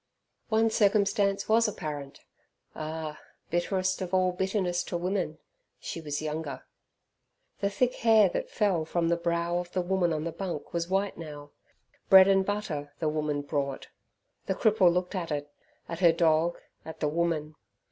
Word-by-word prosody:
One 225 0 +3
circumstance 200 -2 +2
was 225 +1 +4
apparent 150 -8 -6 0.5
ah! 155 0 -5 0.3
bitterest 185 +2 0
of 185 0 -1
all 185 0 +3
bitterness 185 -1 -1
to 175 - -3
women 180 -3 -2 0.4
she 165 - -6
was 150 -1 -4
younger. 155 -2 -4 0.9
The 200 - +1
thick 245 +5 +1
hair 220 -3 +5
that - - -3
fell 190 -6 +1
from 165 +1 0
the 170 - +3
brow 170 0 0
of 175 0 -6
the 185 - +1
woman 180 -1 +1
on 155 -1 -1
the 165 - -3
bunk 175 -4 -5
was 170 0 -2
white 195 0 0
now. 145 -3 -9 0.6
Bread 190 0 +9
and 195 -1 +4
butter 170 -8 -4
the 160 -3 0
woman 150 -1 -1
brought. 140 -2 -3 0.6
The 190 - 0
cripple 205 -5 +4
looked 180 +2 -1
at 180 -4 -3
it, 145 0 -3 0.4
at 170 - -5
her 175 -2 +6
dog, 165 0 +2 0.3
at 160 - -9
the 150 - +1
woman. 155 -1 -1
175 Hz, 160 wpm, -28 LUFS, 155-190 Hz, 0.9 s, Bread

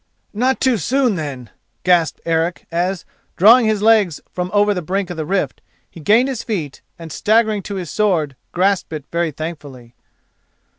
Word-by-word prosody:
"Not 255 +5 +1
too 260 -3 +2
soon, 255 - +1
then," 140 - -6 0.3
gasped 175 -4 +2
Eric 165 +1 -1
as, 180 +2 -1 0.3
drawing 225 +5 +7
his 215 -1 0
legs 215 -8 +4
from 180 0 -3
over 205 0 +3
the 180 - -3
brink 190 +2 -2
of 175 - -6
the 155 -2 -4
rift, 195 +2 -1 0.3
he - - -12
gained 220 - +3
his 260 -4 -3
feet 165 - -4 0.2
and, 165 -2 -9
staggering 215 +3 +2
to 200 +1 -6
his 180 -6 -5
sword, 170 -10 0 0.2
grasped 190 0 +1
it 150 -3 -6
very 170 -1 0
thankfully. 145 -6 -8
180 Hz, 165 wpm, -19 LUFS, 160-210 Hz, 0.3 s, drawing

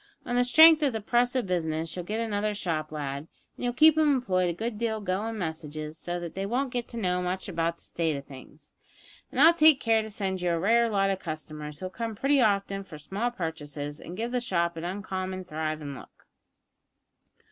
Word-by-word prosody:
On 245 - -2
the 245 - +4
strength 315 +5 +8
of 280 -4 +2
the 220 - -2
press 240 +4 +1
o' 255 - +2
business 165 -3 -2
you'll 180 - -4
get 215 +5 -3
another 210 -2 -1
shop 155 -6 -2
lad, 145 0 -4 0.3
and - - -9
you'll 245 - +1
keep 310 +5 +6
'em 310 -2 +4
employed 185 -10 +1
a - - +1
good 220 +4 -4
deal 225 -2 -1
goin' 210 +3 -2
messages, 155 -3 -5
so 175 +2 -4
that 170 -1 -6
they 195 - -3
won't 250 +6 -1
get 245 -1 -2
to 235 - -9
know 180 -4 0
much 180 +1 -3
about 170 -2 -1
the - - -18
state 160 -3 -1
o' - - -5
things, 140 +2 -14 0.6
and - - -3
I'll 325 +4 +8
take 310 -4 +6
care 225 -3 +3
to 220 - -7
send 190 -3 -3
you 180 - +1
a 165 - 0
rare 230 +5 +3
lot 195 -2 +2
o' - - +1
customers, 155 -4 -7
who'll 185 0 -4
come 225 +1 -4
pretty 275 +5 +3
often 200 -2 +1
for 180 -5 -10
small 195 +10 -2
purchases, 150 - -5
and 180 - -8
give 230 +2 -3
the 250 -1 0
shop 170 -7 0
an 165 - -6
uncommon 185 0 -4
thrivin' 155 -3 -4
look. - - -14
190 Hz, 215 wpm, -28 LUFS, 160-230 Hz, 0.6 s, strength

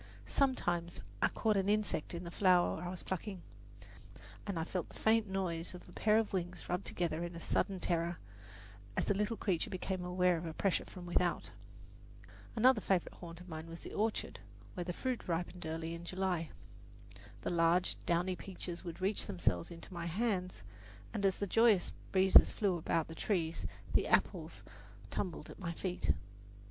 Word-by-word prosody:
Sometimes 175 -11 +1 0.2
I - - +6
caught 215 -2 +1
an 195 +1 +2
insect 210 -6 +1
in 170 - -4
the 170 - -6
flower 180 -4 +4
I 175 - -3
was 180 0 -6
plucking, 190 0 -4 1.0
and 200 -4 -2
I 165 - 0
felt 175 0 -3
the - - -14
faint 220 0 +3
noise 180 -3 -2
of 180 - -11
a - - -13
pair 215 +3 +3
of 220 -2 +1
wings 180 -1 -3
rubbed 180 +2 -1
together 170 -1 -1
in 175 0 -5
a - - -5
sudden 190 +3 0
terror, 170 0 0 0.8
as - - +2
the - - +3
little 210 +3 0
creature 180 -5 0
became 185 -1 -3
aware 180 0 +3
of 165 +1 -4
a 160 - -5
pressure 195 -3 +1
from 180 -2 -9
without. 175 0 +1 1.0
Another 240 0 +5
favourite 190 -3 0
haunt 170 -1 -8
of 180 - -12
mine 160 -1 -6
was 165 0 -8
the - - -7
orchard, 215 +1 -1 0.3
where 180 - -3
the 175 - -3
fruit 255 +7 -3
ripened 175 0 -2
early 160 +1 -3
in 170 0 -6
July. 180 -2 -1 0.9
The - - -1
large, 170 +1 +3
downy 175 +2 +2
peaches 180 -2 -6
would 170 0 -7
reach 195 +2 +2
themselves 175 - 0
into 170 +2 -9
my 170 -1 -3
hand, 185 - -1 0.5
and 200 - -2
as 190 - +1
the 200 - -1
joyous 220 -1 +4 0.2
breezes 190 0 +7
flew 200 -4 +1
about 165 -1 0
the 160 - -7
trees 165 -2 -1 0.3
the - - +3
apples - - +1 0.5
tumbled 170 -5 -3
at - - -12
my 175 -4 -3
feet. 180 +1 0
180 Hz, 180 wpm, -35 LUFS, 170-195 Hz, 1.0 s, breezes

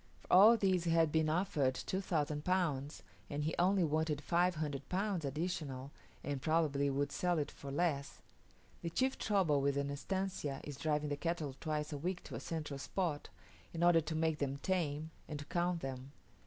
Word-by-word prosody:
For - - -4
all 210 +6 +9
this 185 -4 +2
he - - +1
had 165 -2 +4
been 160 0 +2
offered 155 -6 +1
2000 155 -6 -1
Pounds, 155 -6 0 0.3
and 145 0 -2
he 160 +2 -1
only 185 +1 +4
wanted 155 -1 +1
500 155 -4 0
Pounds 190 -2 0
additional, 140 -3 -3 0.3
and 145 -2 -3
probably 145 -2 +2
would 140 +1 0
sell 175 +2 +1
it 145 -1 -1
for 140 - -9
less. 140 -2 -1 0.6
The 170 - -2
chief 260 +10 0
trouble 180 -9 +2
with 140 0 +1
an 140 0 -1
estancia 150 -2 -2
is 145 -3 -7
driving 150 0 0
the 145 - -1
cattle 160 -4 -2
twice 150 -1 -2
a 145 - -4
week 180 +4 -3
to - - -10
a - - -3
central 150 -4 -4
spot, 155 +1 -2 0.5
in 165 - 0
order 175 -1 +6
to 160 +1 -4
make 160 -1 +1
them 140 -1 -1
tame, 160 -4 -1 0.2
and 150 - -4
to 145 - -7
count 175 +1 0
them. 135 0 -6
155 Hz, 180 wpm, -35 LUFS, 145-175 Hz, 0.6 s, all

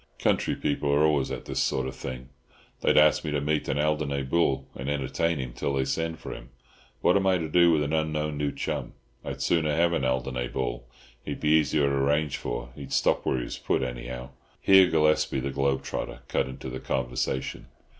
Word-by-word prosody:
Country - - +1
people 70 0 -1
are 70 +1 +4
always 75 -3 +2
at - - -5
this - - -3
sort 65 - +1
of 65 0 -5
thing. 65 0 -7 0.5
They'd - - +2
ask 75 0 +5
me 80 - -3
to 75 -1 0
meet 75 +1 -1
an 70 - 0
Alderney 75 -2 0
bull 70 -2 +1
and 65 +2 -4
entertain 75 +4 0
him 65 -3 -5
till 70 - -2
they 65 -1 +1
send 80 +4 -2
for - - -7
him. - - -10 0.5
What 90 - +4
am 95 -1 +2
I 95 -1 +4
to 80 -2 -3
do 85 +2 +5
with 75 -2 +3
an 75 +2 -2
unknown 75 -1 0
new 75 -1 -1
chum? - - -4 0.3
I'd - - -4
sooner 80 -3 +2
have 85 +2 +3
an 70 - 0
Alderney 65 -1 -1
bull—he'd - - -6
be 75 - 0
easier 75 -2 +3
to 70 - 0
arrange 70 +2 +1
for. - - -5
He'd 70 -1 -9
stop - - +2
where 65 - +2
he 60 - -2
was - - -6
put, - - 0
anyhow." 60 0 -5 0.3
Here 95 -1 +7
Gillespie, 75 -4 +2
the 70 +1 -3
globe 70 0 0
trotter, - - -5
cut - - 0
into 65 0 -7
the 65 - -5
conversation. 65 0 -2
70 Hz, 205 wpm, -27 LUFS, 65-75 Hz, 0.5 s, Here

